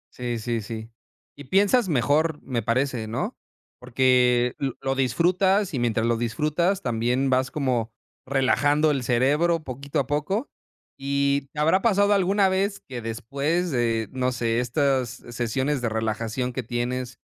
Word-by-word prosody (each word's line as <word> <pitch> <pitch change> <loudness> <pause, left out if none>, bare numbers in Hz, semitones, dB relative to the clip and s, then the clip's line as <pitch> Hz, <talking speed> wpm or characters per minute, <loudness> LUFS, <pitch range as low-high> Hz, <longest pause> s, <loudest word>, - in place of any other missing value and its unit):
Sí, 120 -2 -3
sí, 115 0 -2
sí. 110 +2 -7 0.4
Y 145 -1 -11
piensas 200 - +3
mejor, 150 +4 +1
me 125 -3 -2
parece, 120 0 -1
¿no? 110 - -3 0.4
Porque 125 -1 +3
lo 135 -3 -1
lo 135 0 0
disfrutas, 180 - +2
y 130 - -1
mientras 115 -2 0
lo 115 0 +1
disfrutas 155 - 0
también 125 +3 0
vas 130 0 +2
como 125 -6 -1 0.4
relajando 145 +3 +2
el 140 -3 -1
cerebro 150 +8 +2
poquito 140 +1 -4
a 140 - 0
poco. 150 - -2 0.5
¿Y 140 0 0
te 150 - -7
habrá 165 +5 +3
pasado 205 -2 +3
alguna 195 +1 +3
vez 195 +2 0
que 125 -3 -6
después 140 +10 -2
de, 115 -3 0
no 130 -1 -1
sé, 115 -1 0
estas 130 0 +1 0.2
sesiones 125 +4 -1
de 115 - 0
relajación 110 +3 -2
que 130 - -2
tienes 125 +1 -3
130 Hz, 150 wpm, -24 LUFS, 120-150 Hz, 0.5 s, piensas